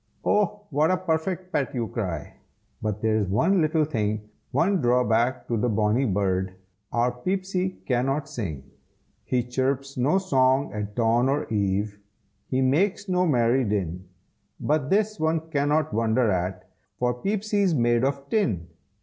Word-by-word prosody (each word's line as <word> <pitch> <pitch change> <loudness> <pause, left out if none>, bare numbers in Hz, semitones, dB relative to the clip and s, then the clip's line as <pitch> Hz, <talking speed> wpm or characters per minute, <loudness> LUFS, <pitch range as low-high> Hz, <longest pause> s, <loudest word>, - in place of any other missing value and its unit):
"Oh 205 0 +1
what 150 +3 +3
a 185 - +3
perfect 180 +1 -2
pet!" 140 -3 -1
you 115 -2 -1
cry, 90 -11 -4 0.5
But 105 -1 -3
there's 110 -2 +2
one 175 - +2
little 155 0 +2
thing, 105 -6 -2 0.2
One 190 +2 +2
drawback 125 0 +2
to 120 - 0
the 120 +3 +1
bonny 110 +4 +2
bird, 95 -3 0 0.4
Our 120 +1 +2
Peepsy 185 +7 -2
cannot 135 +3 0
sing. 100 - -5 0.6
He 125 -1 +1
chirps 135 +2 -2
no 140 +9 +3
song 135 -7 +2
at 105 -1 -5
dawn 120 +2 +2
or 145 +2 0
eve, 100 0 0 0.5
He 130 0 +1
makes 185 +10 +1
no 180 -1 +2
merry 125 -2 +3
din, 95 -4 -2 0.5
But 145 -2 0
this, 215 0 +1
one 160 0 -1
cannot 150 +1 +1
wonder 115 0 +2
at, 90 0 -2 0.3
For 125 0 +1
Peepsy's 200 - 0
made 120 -1 +2
of 140 +1 -1
tin. 105 - 0
130 Hz, 145 wpm, -25 LUFS, 110-160 Hz, 0.6 s, what